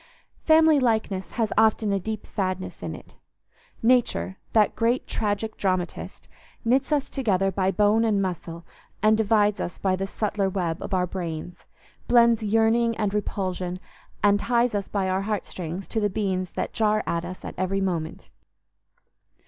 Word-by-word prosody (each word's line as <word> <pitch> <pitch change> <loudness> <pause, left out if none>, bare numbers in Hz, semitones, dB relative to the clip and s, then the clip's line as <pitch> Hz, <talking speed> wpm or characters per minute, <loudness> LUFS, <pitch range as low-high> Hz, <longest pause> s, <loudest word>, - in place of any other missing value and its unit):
Family 315 -2 +5
likeness 220 -6 0
has 225 -3 0
often 220 -1 +3
a 195 - +1
deep 215 +2 -5
sadness 185 -2 -3
in - - -4
it. - - -15 0.7
Nature, 225 - +2
that 215 -2 +3
great 235 +3 +1
tragic 215 +1 -2
dramatist, 185 -2 -3 0.4
knits 260 +5 +2
us 290 -2 0
together 195 -8 +1
by 190 0 0
bone 210 +3 +3
and 215 -3 +2
muscle, 170 -3 -4 0.4
and 215 0 +5
divides 210 -1 +2
us 175 - -4
by 190 -1 +1
the 195 +1 -3
subtler 200 -1 -1
web 175 -3 -2
of 195 - -2
our 180 -1 +2
brains; 175 -2 -5 0.5
blends 235 -1 +5
yearning 225 +2 +2
and 205 -2 -1
repulsion; 185 -3 -2 0.4
and 205 0 +4
ties 240 +1 +1
us 200 -1 -2
by 195 -2 -1
our 190 +1 0
heart 210 0 -2
strings 180 +2 -6
to 225 - -1
the 205 -1 +1
beings 190 -3 -2
that - - -3
jar 215 -1 +2
us 175 +2 -4
at - - -6
every 190 +1 0
movement. 170 -5 -3
205 Hz, 155 wpm, -25 LUFS, 185-220 Hz, 0.7 s, Family